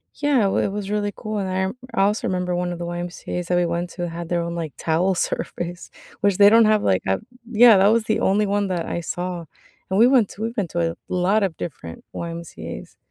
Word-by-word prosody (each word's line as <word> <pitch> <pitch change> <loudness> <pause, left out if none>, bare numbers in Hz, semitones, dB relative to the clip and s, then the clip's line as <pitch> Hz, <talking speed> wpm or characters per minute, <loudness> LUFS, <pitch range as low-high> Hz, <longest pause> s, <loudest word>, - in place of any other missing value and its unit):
Yeah, 285 -7 +2
it - - +1
wa - - 0
it 195 - +1
was 200 -1 -4
really 205 0 -1
cool, 215 0 -4
and 190 -2 -2 0.4
I 230 - -1
I - - +5
also 210 +2 0
remember 180 -1 -1
one 175 0 -1
of 175 - -6
the 175 - -4
YMCAs 175 0 -5
that 180 - +1
we 175 - +2
went 170 +1 -2
to 175 -2 -4
had 170 0 -6
their 175 -1 +1
own, 170 0 -4
like, 160 -4 -4
towel 170 +4 +1
service, 175 0 -3 0.3
which 200 -2 +2
they 205 0 +8
don't 230 +1 +6
have, 215 -1 +3
like, 95 -1 +2
a 95 0 +1 0.3
yeah, 230 -1 +7
that 195 +1 +5
was 225 +1 +3
the 215 - +1
only 205 +2 +2
one 205 0 0
that 175 -3 -2
I 170 - -3
saw. 175 0 -4 0.4
And 190 +2 +1
we 235 - +7
went 250 -6 +4
to 210 - -11
we 225 +1 -2
went 190 -6 -1
to 170 -1 0
a - - -12
lot 185 +4 +2
of 185 -4 -1
different 85 - -7
YMCAs. 170 -1 -7
180 Hz, 245 wpm, -22 LUFS, 170-210 Hz, 0.4 s, they